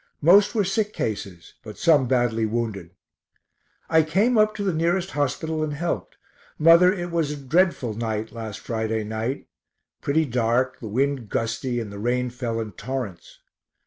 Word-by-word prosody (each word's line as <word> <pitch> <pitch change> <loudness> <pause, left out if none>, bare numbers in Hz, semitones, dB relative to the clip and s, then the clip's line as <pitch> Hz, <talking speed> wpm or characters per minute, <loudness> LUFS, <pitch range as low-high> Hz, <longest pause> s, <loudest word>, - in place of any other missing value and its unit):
Most 200 +7 +6
were 210 - +3
sick 210 +2 -1
cases, 100 -5 -5
but 110 -4 -10
some 150 -6 +4
badly 120 -3 +1
wounded. 110 -6 -3 1.0
I 160 0 +5
came 195 +11 +2
up 215 -1 +3
to 205 - -3
the 190 -3 0
nearest 175 +4 0
hospital 150 +3 -1
and 150 -1 -3
helped. 170 +3 -3 0.4
Mother, 170 +3 +7
it 175 -3 -4
was 165 -3 0
a 150 - -4
dreadful 140 - +1
night 110 0 -3
(last 110 -2 -7
Friday 110 -1 -2
night) 110 +5 -3 0.6
pretty 155 +3 +1
dark, 125 +1 0
the 115 - -7
wind 130 +1 -1
gusty, 115 +2 -2
and 110 -3 -5
the 100 - -7
rain 125 +2 0
fell 120 -2 -3
in 110 -2 -4
torrents. 105 -4 -6
130 Hz, 160 wpm, -24 LUFS, 115-165 Hz, 1.0 s, Mother